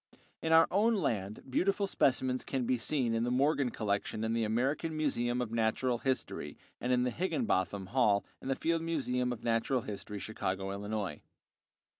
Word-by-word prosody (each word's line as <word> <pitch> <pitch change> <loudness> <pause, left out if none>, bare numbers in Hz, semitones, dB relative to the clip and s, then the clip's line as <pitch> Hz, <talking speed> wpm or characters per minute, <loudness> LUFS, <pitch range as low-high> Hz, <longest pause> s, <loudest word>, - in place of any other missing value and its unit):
In 160 - -1
our 160 0 +7
own 220 +4 +3
land 105 - -2
beautiful 195 +9 +1
specimens 130 -7 +1
can 130 -3 -2
be 125 0 +1
seen 125 -4 +1
in 115 0 +1
the 120 - 0
Morgan 135 +1 +2
collection 105 -1 -2
at 110 0 0
the 115 0 +1
American 135 +9 0
Museum 125 -5 0
of 110 - -6
Natural 115 +2 +1
History 130 0 -2 0.2
and 125 - -1
in 125 0 +3
the 125 - 0
Higinbotham 100 - -1
Hall 110 -5 +3 0.2
in - - -7
the 135 - +1
Field 165 +3 0
Museum 125 -7 0
of 120 - -6
Natural 115 +3 +1
History, 105 0 -6
Chicago, 95 -2 -3
Illinois. 100 -5 -3
125 Hz, 170 wpm, -32 LUFS, 110-140 Hz, 0.2 s, our